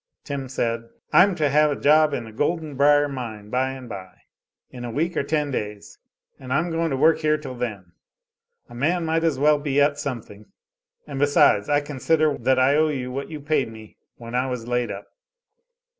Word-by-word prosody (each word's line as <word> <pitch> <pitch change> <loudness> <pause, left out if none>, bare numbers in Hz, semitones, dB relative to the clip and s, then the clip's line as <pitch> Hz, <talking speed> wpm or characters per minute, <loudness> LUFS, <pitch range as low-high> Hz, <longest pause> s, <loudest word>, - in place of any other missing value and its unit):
Tim 140 -3 -5
said: 115 -2 -2 0.2
"I'm 195 0 +6
to 155 -3 +1
have 150 +2 +4
a 145 - -1
job 155 +1 +4
in 140 - -3
the 110 - -10
Golden 155 +5 -2
Brier 145 +1 +4
mine 110 -6 -7
by 130 +1 0
and 130 -2 -9
by 95 -4 -8 0.6
in 125 - -8
a 120 - -4
week 160 +9 -1
or - - +1
ten 150 0 -1
days 105 -4 -5 0.4
and 130 -1 -9
I'm 160 +6 +1
going 165 0 0
to 135 - -1
work 160 +3 +4
here 155 -1 +2
till 130 - -8
then. 105 -8 -5 0.8
A - - -14
man 165 +8 0
might 165 +1 0
as 160 -5 +1
well 150 +2 +4
be 145 -1 0
at 145 0 +2
some 135 -6 -4
thing, 105 +1 -15 0.6
and 140 -2 -6
besides 145 -8 +4
I 145 0 +3
consider 150 +1 +1
that 130 +2 +2
I 130 +2 +4
owe 155 0 +3
you 130 -4 -3
what 135 +2 -5
you 155 -2 -6
paid 145 -5 0
me 110 -1 -13 0.2
when 115 0 -10
I 125 +1 0
was 125 -3 -5
laid 120 0 0
up." - - -6
140 Hz, 205 wpm, -23 LUFS, 120-150 Hz, 0.8 s, I'm